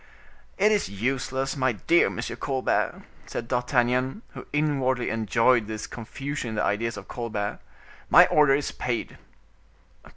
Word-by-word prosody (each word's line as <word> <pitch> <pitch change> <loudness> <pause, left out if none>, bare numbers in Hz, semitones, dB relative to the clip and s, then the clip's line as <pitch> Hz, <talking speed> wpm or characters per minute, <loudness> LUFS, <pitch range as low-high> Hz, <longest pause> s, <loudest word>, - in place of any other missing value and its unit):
"It 210 +2 +4
is 210 -2 +1
useless, 130 +6 -2
my 130 -3 +1
dear 170 - +3
Monsieur - - -5
Colbert," 135 -2 -1 0.2
said 115 - -5
D'Artagnan, 125 - 0
who - - -10
inwardly 135 -4 0
enjoyed 115 +1 +2
this 110 0 -5
confusion 135 +3 -5
in 110 - -5
the 105 - 0
ideas 115 +2 -1
of 100 - -9
Colbert; 105 -4 -4 0.5
"my - - +8
order 150 -2 +4
is 145 - -2
paid." 120 -2 -4
125 Hz, 135 wpm, -26 LUFS, 115-135 Hz, 0.5 s, my